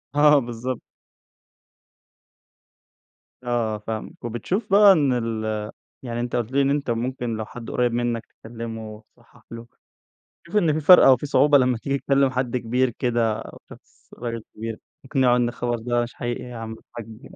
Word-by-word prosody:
آه. 150 0 +6
بالضبط. 120 0 -4 2.6
آه، 120 -3 -1
فاهمك. 110 +2 -7
وبتشوف 175 - -3
بقى 205 0 +8
إن 145 -7 +2
ال 110 -3 -2 0.3
يعني 120 -2 -4
أنت 120 0 -3
قلت 120 0 -2
لي، 140 +1 +2
إن 135 - +2
أنت 140 -3 0
ممكن 120 0 -2
لو 110 - -4
حد 115 0 -9
قريب 120 -1 +1
منّك 120 -1 -1 0.2
تكلمه، 115 -1 -7
تصحح - - -23
له، 115 0 -9 0.7
بتشوف 170 +4 -11
إنّه 165 -6 +3
في 155 - -1
فرق 180 +4 +8
أو 130 -1 +7
في 135 - -6
صعوبة 145 0 +5
لمّا 125 -2 +2
تيجي 140 +4 -2
تكلم 140 -1 +2
حد 125 -1 -1
كبير 125 +2 0
كده 115 -2 0
أو - - -11
شخص - - -18
راجل 115 -2 -5
كبيرتقنعه 125 +3 -1
إن 120 -1 +1
الخبر 120 0 -2
ده 120 +1 0
مش 120 - -7
حقيقي 120 0 -4
يا 125 -1 -9
عم 115 -1 -6
الحج؟ 115 +1 -11
120 Hz, 160 wpm, -23 LUFS, 115-135 Hz, 2.6 s, بقى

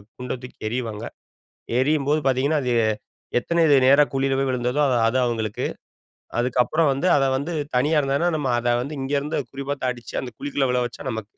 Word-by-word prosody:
குண்ட 125 0 -5
தூக்கி 125 - -11
எறிவாங்க 115 -2 -4 0.7
எரியும்போது 150 +2 +2
பார்த்தீங்கன்னா 140 +3 +2
அது 125 -1 0 0.7
எத்தன 170 +5 +1 0.2
நேரா 140 +2 +7
குழியில 135 0 +1
போய் 135 -1 0
விழுந்ததோ 125 +2 -1
அது 125 - +2
அது 125 +3 +1
அவங்களுக்கு. 110 -3 -2 0.7
அதுக்கப்புறம் 125 +6 +2
வந்து 135 +7 -1
அத 135 - +3
வந்து 145 +6 -3 0.2
தனியா 150 +5 +2
இருந்தாங்கன்னா 145 +5 +1
நம்ம 145 -4 -2
அத 120 0 +1
வந்து 140 +5 -5
இங்க 135 +2 -4
இருந்து 150 +3 -3
குறிப்பாத்து 140 0 -4
அடிச்சு 120 -2 -9
அந்த 125 - -6
குழிக்குள்ள 140 -2 -1
விழ 125 - +2
வச்சா 125 +3 -7
நமக்கு. 110 -2 -4
135 Hz, 170 wpm, -23 LUFS, 125-145 Hz, 0.7 s, நேரா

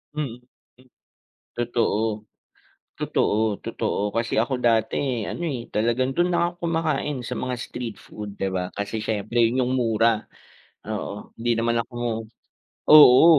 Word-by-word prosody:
Mm. 135 -6 -3 1.2
Totoo, 115 -3 0 0.7
totoo, 110 -1 +1
totoo. 105 +1 -2
Kasi 115 -1 +1
ako 130 +4 +1
dati 115 +1 +1
ano, 175 - -5
eh, 125 -6 -4
talagang 120 +4 +1
do'n 175 +1 +2
na 175 - +2
ako 175 0 -19
kumakain 155 -4 0
sa - - -4
mga 125 0 -2
street 120 -3 -5
food, 105 -1 -9
'di 95 - 0
ba? 90 -1 -2
Kasi 105 +2 -3
siyempre 110 +2 -1
'yung 125 +2 +2
mura, 115 -2 +2 0.6
oo, - - -5
hindi 120 +1 +1
naman 115 0 +1
ako 120 +2 -13 1.0
oo, 150 -2 +10
115 Hz, 130 wpm, -24 LUFS, 110-130 Hz, 1.2 s, oo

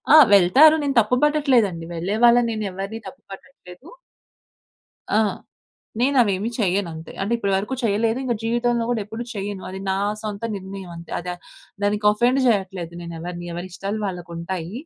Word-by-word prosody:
ఆ! - - +11 0.2
వెళ్తారు. 255 - +7
నేను 275 -2 -1
తప్పు 225 +3 +2
పట్టట్లేదండి. 250 - +2
వెళ్ళే 185 +6 -2
వాళ్ళని 240 0 +6
నేనెవ్వరిని 200 0 -4
తప్పు - - -11
పట్టట్లేదు. 195 - -13 1.3
ఆ! - - +5 0.8
నేనవేమి 235 -6 +2
చేయనంతే. 180 -5 -2
అంటే 205 +4 -2
ఇప్పటివరకు 200 +3 -1
చేయలేదు, 225 +2 +1
ఇంక 245 -2 0
జీవితంలో 240 0 +1
గూడా 235 -3 0
ఎప్పుడు 225 +3 -6
చెయ్యను. 200 -1 -5
అది 190 +1 -7
నా 190 - +1 0.3
సొంత 210 0 -5
నిర్ణయం 190 -1 -8
అంతే. 170 0 -11
అదే 180 +1 -5 0.5
దానికి 210 +1 0
అఫెండ్ 240 +5 +2
చేయట్లేదు 190 -5 -1
నేనెవరిని. 170 +1 -7
ఎవరిష్టాలు 185 +4 -5
వాళ్ళకుంటాయి. 175 -1 -5
200 Hz, 135 wpm, -22 LUFS, 180-235 Hz, 1.3 s, ఆ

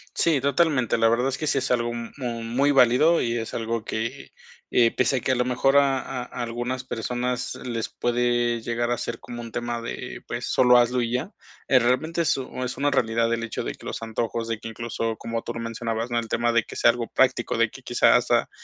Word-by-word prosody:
Sí, 160 -4 +3
totalmente. 140 -3 +2
La 115 0 +5
verdad 120 +3 +2
es 135 - -4
que 155 - -2
sí 145 - +1
es 135 -1 -1
algo 120 -1 +1
mu 120 0 -5
muy 125 +5 +1
válido 135 +5 +5
y 115 0 0
es 115 -1 -5
algo 115 -1 -2
que, 115 +5 -4 0.4
eh, 115 -2 +4
pese 130 +1 +2
a - - +1
que 130 - 0
a - - +3
lo 125 - +2
mejor 125 +2 +1
a 135 -2 +1
a 125 0 -6
algunas 120 +2 -3
personas 125 +1 -3
les 120 -3 -4
puede 120 -1 0
llegar 120 +1 -1
a 120 - +1
ser 115 -1 -4
como 120 0 -8
un 115 -1 -8
tema 120 0 -3
de, 115 - -6
pues, - - -4
solo 125 -1 +5
hazlo 120 +1 +3
y 120 0 -2
ya, 130 +10 -2 0.4
eh, 130 - +5
realmente, 130 +8 +1
es 160 - +2 0.3
es 125 -1 -4
una 145 +2 +1
realidad 115 -1 +1
el 115 - -1
hecho 115 - -4
de - - -3
que - - -12
los - - -5
antojos 115 +1 -3
de 115 -1 -3
que 115 - -8
incluso 115 0 -3
como 115 0 -4
tú 120 - -5
lo - - -4
mencionabas, 115 0 -3
¿no?, 120 - +2
el 115 - -5
tema 120 +1 +1
de 115 - +4
que - - -11
sea 120 - +5
algo 120 -1 -4
práctico, - - +1
de - - +2
que - - -12
quizá - - +4
hasta, - - +2
120 Hz, 230 wpm, -25 LUFS, 115-130 Hz, 0.4 s, La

